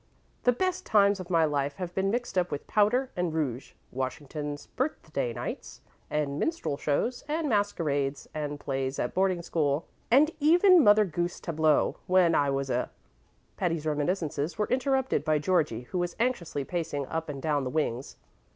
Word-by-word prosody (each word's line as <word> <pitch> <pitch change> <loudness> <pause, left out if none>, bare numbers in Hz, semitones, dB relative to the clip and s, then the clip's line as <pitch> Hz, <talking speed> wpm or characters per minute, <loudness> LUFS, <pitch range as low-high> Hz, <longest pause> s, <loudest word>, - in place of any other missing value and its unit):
"The 245 - +6
best 370 +8 -1
times 200 -1 +3
of 185 -1 -7
my 165 -3 +4
life 140 -2 -1
have 180 +1 -5
been 190 +1 0
mixed 240 +1 -2
up 180 -1 +1
with 145 - -5
powder 240 +5 +2
and 180 -2 -1
rouge 135 -5 -2 0.2
Washington's 145 +3 -4
Birthday 155 - -3
nights, - - -6 0.3
and 145 -1 -1
minstrel 330 - -1
shows, 150 - -1
and 310 +1 -1
masquerades, 155 - 0
and 145 -1 -4
plays 135 -1 -2
at 120 - -2
boarding 185 -2 +1
school, 150 -3 0 0.2
and 285 +7 +5
even 350 +3 +6
Mother 210 -1 +6
Goose 175 0 -3
tableaux 155 -2 +1
when 180 -2 +4
I 145 -2 +3
was 135 -1 -1
a 125 - 0 0.3
" - - -39
Patty's 165 -3 -1
reminiscences 155 0 -1
were 210 - 0
interrupted 265 0 +1
by 155 -1 +2
Georgie, 150 -7 +1
who 150 +9 -4
was 175 0 -2
anxiously 205 - -1
pacing 150 -3 -3
up 160 +2 -4
and 140 -2 -5
down 145 -1 0
the 130 - -2
wings. 130 -3 -2
165 Hz, 170 wpm, -28 LUFS, 145-205 Hz, 0.3 s, The